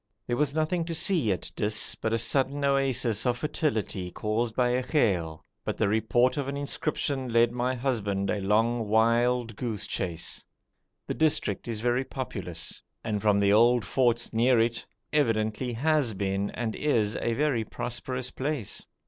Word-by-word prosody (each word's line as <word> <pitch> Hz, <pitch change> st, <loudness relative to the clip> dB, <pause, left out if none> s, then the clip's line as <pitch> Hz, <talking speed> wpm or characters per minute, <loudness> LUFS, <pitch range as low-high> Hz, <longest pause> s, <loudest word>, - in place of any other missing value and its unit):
There 120 Hz, -, -1 dB
was 145 Hz, +1 st, 0 dB
nothing 160 Hz, +2 st, 0 dB
to 165 Hz, 0 st, -4 dB
see 160 Hz, -, +2 dB
at 95 Hz, -, -3 dB
Dis 105 Hz, +1 st, +2 dB
but 110 Hz, -, -3 dB
a 115 Hz, -, +2 dB
sudden 135 Hz, +5 st, +1 dB
oasis 130 Hz, -5 st, +1 dB
of 125 Hz, 0 st, +1 dB
fertility 115 Hz, -, -2 dB
caused 110 Hz, +5 st, -2 dB
by 125 Hz, -1 st, +2 dB
a 125 Hz, +1 st, +1 dB
ghail, 95 Hz, -, 0 dB, 0.2 s
but -, -, -3 dB
the 110 Hz, -, +2 dB
report 110 Hz, +5 st, +2 dB
of 140 Hz, -2 st, -2 dB
an 140 Hz, 0 st, -3 dB
inscription 140 Hz, -2 st, -2 dB
led 115 Hz, 0 st, +4 dB
my 125 Hz, +1 st, -1 dB
husband 105 Hz, -7 st, -1 dB
a 105 Hz, -, -1 dB
long 110 Hz, +3 st, +1 dB
wild 115 Hz, +1 st, +2 dB
goose 110 Hz, -3 st, -3 dB
chase. 85 Hz, -2 st, -3 dB, 0.6 s
The -, -, -3 dB
district 150 Hz, -11 st, 0 dB
is 110 Hz, -2 st, -3 dB
very 120 Hz, +2 st, +1 dB
populous, 95 Hz, -12 st, -5 dB, 0.2 s
and 105 Hz, -3 st, -2 dB
from 105 Hz, -2 st, +3 dB
the 100 Hz, 0 st, +4 dB
old 120 Hz, +2 st, +4 dB
forts 120 Hz, -3 st, +1 dB
near 120 Hz, +2 st, +4 dB
it 115 Hz, +1 st, +1 dB, 0.3 s
evidently 115 Hz, -3 st, +1 dB
has 140 Hz, -2 st, +1 dB
been 100 Hz, +1 st, -1 dB
and 110 Hz, -1 st, -3 dB
is 115 Hz, -8 st, +1 dB
a 115 Hz, -, -1 dB
very 135 Hz, -3 st, +1 dB
prosperous 125 Hz, +3 st, -4 dB
place. 135 Hz, -6 st, -3 dB
120 Hz, 165 wpm, -27 LUFS, 110-130 Hz, 0.6 s, led